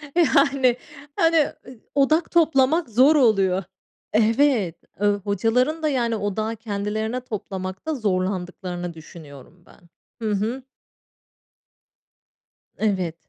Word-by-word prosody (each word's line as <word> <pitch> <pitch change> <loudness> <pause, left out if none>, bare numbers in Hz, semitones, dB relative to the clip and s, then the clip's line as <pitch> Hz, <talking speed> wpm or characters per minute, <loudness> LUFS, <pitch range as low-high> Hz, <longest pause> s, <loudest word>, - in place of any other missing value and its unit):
Yani, 275 -6 +3 0.4
hani, 330 0 +3 0.3
eee, 255 -3 -12 0.2
odak 310 +4 +2
toplamak 315 -2 +3
zor 260 +8 +5
oluyor. 195 -8 +3 0.5
Evet. 225 - +2 0.5
Hocaların 235 - 0
da 310 - +2
yani, 240 -4 0
odağı 215 +2 -2
kendilerine 220 +2 -3
toplamakta 195 +3 -5
zorlandıklarını 185 -4 -3
düşünüyorum 160 0 -14
ben. - - -20 0.5
Hı 215 - 0
hı. 225 +6 -2 2.1
Evet. 185 -6 -1
220 Hz, 90 wpm, -23 LUFS, 190-270 Hz, 2.1 s, zor